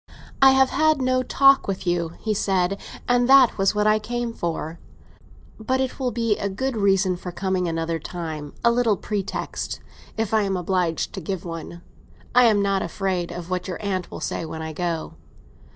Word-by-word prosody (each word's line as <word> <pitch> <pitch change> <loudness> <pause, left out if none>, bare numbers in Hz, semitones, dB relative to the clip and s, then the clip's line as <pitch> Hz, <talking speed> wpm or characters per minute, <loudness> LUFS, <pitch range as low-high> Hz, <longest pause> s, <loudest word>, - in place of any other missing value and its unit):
"I 270 0 +8
have 265 0 +4
had 310 -2 +3
no 255 0 +2
talk 275 +2 +4
with 190 -1 -3
you," 170 -2 0
he 220 - -1
said, 195 -1 0 0.3
"and 245 0 +3
that 265 -5 +6
was 195 +2 +2
what 210 0 +1
I 215 0 +4
came 240 +2 -3
for. 165 -3 -4 0.8
But 260 +4 0
it 265 0 -2
will 255 -2 0
be 230 -2 0
a 200 - -1
good 255 +6 -2
reason 195 -3 +2
for 180 0 -7
coming 185 0 -1
another 165 0 -2
time; 155 -3 -6
a 235 - +6
little 235 -4 +2
pretext—if 210 +1 -5
I 220 - +4
am 195 -2 0
obliged 180 -2 -1
to - - -5
give 185 +2 -4
one. 170 +1 -7 0.5
I 250 0 +6
am 210 -3 +4
not 195 -1 +1
afraid 180 0 -2
of 175 0 -7
what 180 -1 -2
your 180 - -4
aunt 190 -4 -3
will - - -7
say - - -3
when 160 0 -6
I 160 0 -5
go." 170 -1 -3
195 Hz, 185 wpm, -23 LUFS, 175-235 Hz, 0.8 s, I